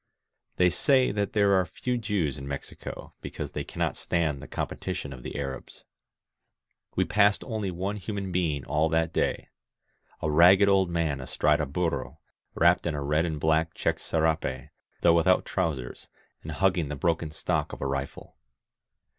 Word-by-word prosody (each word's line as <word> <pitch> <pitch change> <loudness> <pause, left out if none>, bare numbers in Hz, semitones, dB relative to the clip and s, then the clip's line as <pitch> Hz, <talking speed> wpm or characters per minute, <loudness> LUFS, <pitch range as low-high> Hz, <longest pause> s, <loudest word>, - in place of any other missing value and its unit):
They 90 -1 +4
say 130 +8 +3
that 100 -1 -2
there 100 -2 +4
are 95 -1 +4
few 125 +8 -3
Jews 100 - -1
in 70 - -7
Mexico 70 0 -7
because - - -6
they - - -3
cannot - - -2
stand 75 -5 -1
the - - -9
competition 70 - -4
of 65 - -10
the - - -6
Arabs. 70 -2 -6 1.1
We - - +2
passed 105 0 +3
only 110 -5 -3
one 95 +4 -3
human 100 -2 -4
heing 80 -7 0
all 80 +2 +1
that 80 0 +1
day - - -1 0.4
— - - -36
a 80 - +1
ragged 90 +6 +7
old 95 -2 +3
man 80 -5 -1
astride 75 +4 +1
a 75 - -2
burro, 75 -2 -2 0.4
wrapped 85 +1 +4
in 80 - -1
a 70 - -3
red 75 +3 +1
and 80 -3 -3
black 80 +1 +1
checked - - -1
serape, 80 -5 -1 0.3
though 85 - +5
without 85 +2 +3
trousers, 75 -10 -3 0.3
and 80 - -6
hugging 90 -2 +1
the 75 - -3
broken 80 +1 0
stock 75 - -2
of - - -8
a - - -3
rifle. 70 0 -4
80 Hz, 170 wpm, -27 LUFS, 75-95 Hz, 1.1 s, ragged